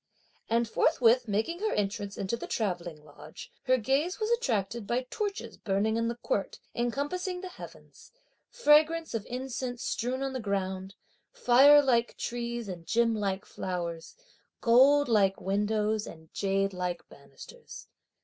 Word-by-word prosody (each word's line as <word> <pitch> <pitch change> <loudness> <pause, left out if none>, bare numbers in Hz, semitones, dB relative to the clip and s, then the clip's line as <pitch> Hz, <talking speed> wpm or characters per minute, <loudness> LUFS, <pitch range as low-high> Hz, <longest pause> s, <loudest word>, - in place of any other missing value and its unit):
And 230 +1 +2
forthwith 245 -2 +3
making 220 - -1
her 435 +1 -1
entrance 205 0 -2
into 195 +4 -2
the - - -7
travelling 175 -7 -3
lodge 150 +1 -12
her 255 0 +4
gaze 275 - 0
was 435 +1 -1
attracted 230 - -1
by 250 +3 -1
torches 415 -1 -4
burning 205 +2 0
in 230 0 0
the 235 - -2
court 205 -4 -2 0.2
encompassing 290 +10 -2
the 370 - -6
heavens, - - -13 0.4
fragments 325 -5 +3
of 225 -3 -3
incense 250 -1 -4
strewn 255 +3 -2
on 270 -1 -3
the 260 - -3
ground, 190 -2 -3 0.4
fire 290 - +6
like 240 -3 +1
trees 235 -1 -4
and 175 -3 -8
gem 230 0 +2
like 200 -3 -2
flowers, 170 -3 -5 0.4
gold 275 +5 +5
like 200 -4 +3
windows 210 +2 0
and 160 -1 -13
jade 195 0 0
like 180 -1 -4
bannisters. 140 -1 -13
230 Hz, 140 wpm, -29 LUFS, 195-265 Hz, 0.4 s, fire